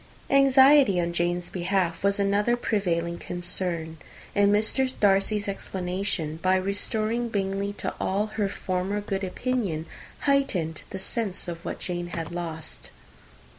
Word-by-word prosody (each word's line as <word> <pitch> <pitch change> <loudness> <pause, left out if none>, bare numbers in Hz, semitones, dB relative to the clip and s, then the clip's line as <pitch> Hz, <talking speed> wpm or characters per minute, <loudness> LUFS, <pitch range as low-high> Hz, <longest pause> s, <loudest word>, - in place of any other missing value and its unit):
Anxiety 275 -5 +6
on 170 0 -1
Jane's 175 +1 -1
behalf 180 -1 -1
was 200 0 +2
another 205 +4 +2
prevailing 170 -7 -1
concern; 175 -2 -1 0.4
and 205 0 +4
Mr. 220 +5 +2
Darcy's 205 +1 +2
explanation, 185 -4 -3
by 185 0 +3
restoring 215 +5 -1
Bingley 200 -1 -1
to - - -4
all 200 +2 0
her 205 -3 0
former 190 +2 -2
good 200 -1 -3
opinion, 190 -5 -2 0.4
heightened 210 - +1
the 195 - -5
sense 195 -1 -3
of 170 -1 -6
what - - -3
Jane 175 -1 -3
had 165 -2 -5
lost. 165 -2 -5
195 Hz, 130 wpm, -26 LUFS, 175-210 Hz, 0.4 s, Anxiety